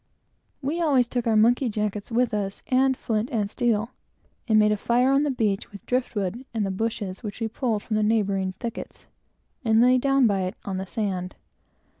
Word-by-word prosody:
We 310 +6 -1
always 275 -7 +3
took 240 0 -3
our 225 - +3
monkey 240 +4 +4
jackets 210 0 -3
with 240 0 +1
us, 200 -2 -3
and 265 0 +3
flint 220 +2 -1
and 215 -5 0
steel, 230 -1 0 0.6
and 220 -2 +4
made 210 0 +5
a - - +3
fire 245 +5 +2
on 275 +1 +4
the 295 - +1
beach 215 -7 -1
with 200 - -10
the - - -38
driftwood 235 -3 -2
and 215 -2 0
the 195 - -2
bushes 200 -2 -3
we 215 - -4 0.2
pulled 225 -2 -2
from 215 - -2
the - - +2
neighboring 200 -3 +1
thickets, 230 +5 -7 0.6
and 225 -2 +3
lay 250 +2 +5
down 275 0 +3
by 200 -4 +2
it, 185 - -4
on 190 -2 -3
the 190 0 -4
sand. 190 -4 -3
220 Hz, 195 wpm, -25 LUFS, 205-250 Hz, 0.6 s, made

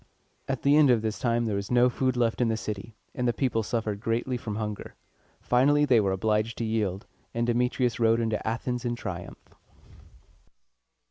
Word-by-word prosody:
At 135 -2 -3
the 140 +1 +5
end 150 -3 +6
of 115 -3 +3
this 110 -1 -2
time 120 -1 +1
there 105 -3 -1
was 100 0 -4
no 125 0 +5
food 130 0 0
left 120 0 +1
in 120 - +3
the 110 -1 0
city, 105 0 -6 0.2
and 125 - -1
the 120 - +2
people 120 -2 0
suffered 110 -2 -2
greatly 115 +4 -1
from 110 -3 -5
hunger. 105 -2 -5 0.4
Finally 145 +4 +3
they 125 -5 +4
were 100 -2 +1
obliged 110 +3 0
to 115 - -2
yield; 110 -2 -1 0.3
and 120 0 +1
Demetrius 125 0 0
rode 115 0 +3
into 110 -2 -2
Athens 120 +2 -2
in 120 -1 -1
triumph. 95 -6 -6
115 Hz, 185 wpm, -27 LUFS, 110-125 Hz, 0.4 s, end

